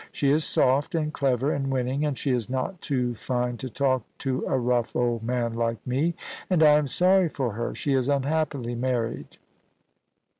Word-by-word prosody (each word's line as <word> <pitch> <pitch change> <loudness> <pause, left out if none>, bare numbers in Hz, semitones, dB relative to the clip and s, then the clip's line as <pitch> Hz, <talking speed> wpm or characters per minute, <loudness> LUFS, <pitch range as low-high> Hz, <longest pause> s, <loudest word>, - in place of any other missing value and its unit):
She 140 -1 +1
is 155 +2 +3
soft 140 +5 +2
and 155 -1 -1
clever 135 0 +1
and 135 -1 -2
winning, 130 +2 -1
and 145 -3 -1
she 140 - -1
is 120 -3 -1
not 130 +8 -3
too 125 -4 -1
fine 125 +1 -2
to 130 0 -6
talk 130 +1 +1 0.2
to 130 -1 -1
a 135 - +1
rough 120 -2 0
old 120 -2 0
man 120 0 -1
like 115 -2 -2
me. 145 +7 0 0.3
And 175 -4 +3
I 150 -1 +7
am 150 - -2
sorry 185 +3 +3
for 130 -5 -2
her. 115 +3 -3
She 140 - -1
is 130 0 +1
unhappily 140 -3 0
married. 120 -2 -2
130 Hz, 185 wpm, -26 LUFS, 120-145 Hz, 0.3 s, I